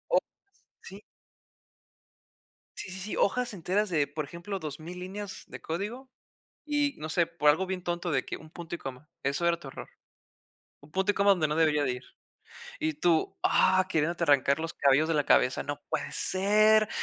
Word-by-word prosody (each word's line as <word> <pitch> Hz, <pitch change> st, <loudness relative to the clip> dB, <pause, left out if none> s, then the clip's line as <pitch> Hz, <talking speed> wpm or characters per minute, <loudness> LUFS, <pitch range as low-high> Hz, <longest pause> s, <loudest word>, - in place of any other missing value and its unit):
O -, -, +7 dB
o -, -, +7 dB, 0.7 s
sí. 195 Hz, +2 st, -10 dB, 1.8 s
Sí, 190 Hz, -, -5 dB
sí, 190 Hz, -, -5 dB
sí, 205 Hz, +3 st, -4 dB
hojas 245 Hz, +2 st, +1 dB
enteras 195 Hz, +3 st, 0 dB
de, 150 Hz, -4 st, +1 dB
por 150 Hz, +1 st, -4 dB
ejemplo, 170 Hz, +6 st, -6 dB
2000 160 Hz, +3 st, -7 dB
líneas 195 Hz, +2 st, -6 dB
de -, -, -10 dB
código 215 Hz, +11 st, -5 dB, 0.6 s
y, 290 Hz, -1 st, +1 dB
no 155 Hz, +1 st, -5 dB
sé, 170 Hz, +1 st, +2 dB
por 150 Hz, -3 st, +3 dB
algo 185 Hz, +6 st, +1 dB
bien 185 Hz, -1 st, -4 dB
tonto 175 Hz, 0 st, -2 dB
de 135 Hz, -4 st, +1 dB
que -, -, -5 dB
un 155 Hz, -, -14 dB
punto 170 Hz, 0 st, -7 dB
y -, -, -5 dB
coma. 135 Hz, +3 st, -8 dB
Eso 140 Hz, +5 st, 0 dB
era 170 Hz, 0 st, +2 dB
tu 140 Hz, -, -10 dB
error. -, -, -9 dB, 0.9 s
Un 145 Hz, -, -17 dB
punto 190 Hz, +4 st, +2 dB
y -, -, -7 dB
coma 200 Hz, 0 st, +5 dB
donde 170 Hz, -5 st, +2 dB
no 150 Hz, -, -1 dB
debería 155 Hz, -2 st, +3 dB
de 130 Hz, -, +1 dB
ir. 125 Hz, -, -8 dB, 0.8 s
Y 315 Hz, 0 st, -1 dB
tú, 175 Hz, -, +1 dB
¡ah! 185 Hz, 0 st, +4 dB
Queriéndote 170 Hz, +1 st, 0 dB
arrancar 140 Hz, -1 st, +4 dB
los 165 Hz, 0 st, -4 dB
cabellos 140 Hz, +3 st, +3 dB
de 165 Hz, -, +1 dB
la 145 Hz, -1 st, +2 dB
cabeza. 130 Hz, -, +3 dB
¡No 145 Hz, 0 st, -5 dB
puede -, -, -2 dB
ser! 215 Hz, +3 st, +4 dB
170 Hz, 190 wpm, -29 LUFS, 150-195 Hz, 1.8 s, O